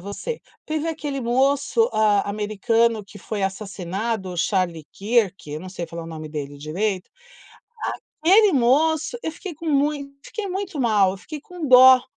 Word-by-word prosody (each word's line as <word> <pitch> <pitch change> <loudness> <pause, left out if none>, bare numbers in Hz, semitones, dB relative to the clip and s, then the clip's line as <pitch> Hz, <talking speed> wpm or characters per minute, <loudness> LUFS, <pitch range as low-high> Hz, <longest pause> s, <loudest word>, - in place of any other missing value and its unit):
você, 200 - -5 0.3
teve 310 +1 -2
aquele 295 -4 -3
moço, 275 - +2
ah, 210 -2 +3
americano 215 +2 +1
que 205 +1 -13
foi 205 +1 -4
assassinado, 195 +1 -3
o 180 - -6
Charlie 175 -3 0
Kirk, 200 -6 0
eu 150 +1 -5
não 185 - -8
sei 175 -2 -5
falar 170 0 -7
o - - -9
nome 155 -1 -7
dele 145 -2 -6
direito. 185 +6 -2 1.1
Aquele 395 +5 +6
moço, 300 - +2
eu - - -2
fiquei 355 +1 -8
com 330 +3 -9
mui 290 +1 +2
eu 280 0 -9
fiquei 430 -4 -5
muito 375 -5 -3
mal, 210 -6 +3
eu - - -7
fiquei 295 - -8
com 350 -1 -7
dó. 255 0 +8
225 Hz, 170 wpm, -23 LUFS, 190-295 Hz, 1.1 s, dó